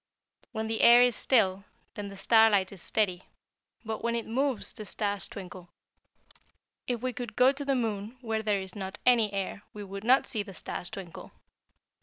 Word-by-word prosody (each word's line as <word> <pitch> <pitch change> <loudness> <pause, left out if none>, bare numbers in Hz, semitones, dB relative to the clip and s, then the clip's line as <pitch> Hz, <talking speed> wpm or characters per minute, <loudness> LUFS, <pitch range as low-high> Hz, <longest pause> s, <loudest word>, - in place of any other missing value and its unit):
When 220 0 -3
the 225 0 -2
air 240 +1 +8
is 245 -2 +2
still 195 -7 +2 0.3
then 205 -1 -6
the 200 0 -10
starlight 205 -1 +4
is 195 -4 -11
steady, 185 -3 0 0.6
but 220 0 -4
when 235 0 0
it 230 - -2
moves 260 0 0
the 215 - -7
stars 205 -1 -2
twinkle. 180 -2 -10 1.2
If 245 -1 -2
we 255 -1 -1
could 240 -4 -6
go 255 +1 +5
to 280 +1 -5
the 275 -1 0
moon, 220 -1 -3
where 225 -2 -2
there 205 -2 0
is 190 -1 -7
not 195 0 -6
any 230 -4 +4
air, 195 0 -4
we 210 - -7
would 195 0 -8
not 255 +4 +4
see 220 - -2
the 200 -2 -9
stars 175 - -5
twinkle." 185 -4 -9
215 Hz, 185 wpm, -29 LUFS, 195-235 Hz, 1.2 s, air